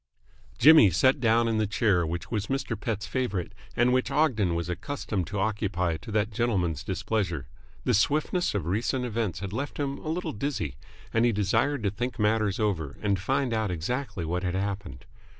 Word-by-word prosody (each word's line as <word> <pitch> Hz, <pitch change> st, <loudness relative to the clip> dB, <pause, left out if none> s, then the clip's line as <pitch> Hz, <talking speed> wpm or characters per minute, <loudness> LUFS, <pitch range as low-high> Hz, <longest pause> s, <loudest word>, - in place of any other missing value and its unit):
Jimmy 155 Hz, -9 st, +8 dB
sat 130 Hz, -, +3 dB
down 115 Hz, -1 st, +3 dB
in 110 Hz, -1 st, +1 dB
the 105 Hz, -, +1 dB
chair 95 Hz, -5 st, +2 dB
which 85 Hz, +2 st, -5 dB
was 105 Hz, -3 st, -1 dB
Mr. 135 Hz, -3 st, -2 dB
Pett's 105 Hz, -1 st, -3 dB
favourite 100 Hz, -4 st, -2 dB, 0.2 s
and 120 Hz, +1 st, +3 dB
which 130 Hz, 0 st, +1 dB
Ogden 130 Hz, -, +2 dB
was 85 Hz, 0 st, -2 dB
accustomed 95 Hz, -, -3 dB
to 105 Hz, -, -4 dB
occupy 95 Hz, -5 st, 0 dB
to 85 Hz, -, -10 dB
that 105 Hz, +1 st, +1 dB
gentleman's 95 Hz, -, 0 dB
displeasure. 95 Hz, -10 st, -2 dB, 0.4 s
The -, -, +2 dB
swiftness 155 Hz, -, +1 dB
of 95 Hz, -6 st, -1 dB
recent 115 Hz, +8 st, 0 dB
events 110 Hz, -6 st, -2 dB
had 100 Hz, 0 st, -5 dB
left 140 Hz, +6 st, -4 dB
him 140 Hz, -1 st, -2 dB
a 155 Hz, -, -6 dB
little 175 Hz, +3 st, -2 dB
dizzy, 105 Hz, -, -2 dB, 0.4 s
and 115 Hz, -, +3 dB
he 120 Hz, -, +4 dB
desired 115 Hz, +6 st, +1 dB
to 100 Hz, -, +1 dB
think 120 Hz, +5 st, -3 dB
matters 105 Hz, -2 st, +1 dB
over 90 Hz, -10 st, -1 dB
and 100 Hz, -2 st, +1 dB
find 130 Hz, +5 st, 0 dB
out 110 Hz, -2 st, 0 dB
exactly 100 Hz, -, -3 dB
what 90 Hz, +3 st, -1 dB
had 90 Hz, -1 st, -2 dB
happened. 95 Hz, -7 st, -4 dB
105 Hz, 185 wpm, -27 LUFS, 95-125 Hz, 0.4 s, Jimmy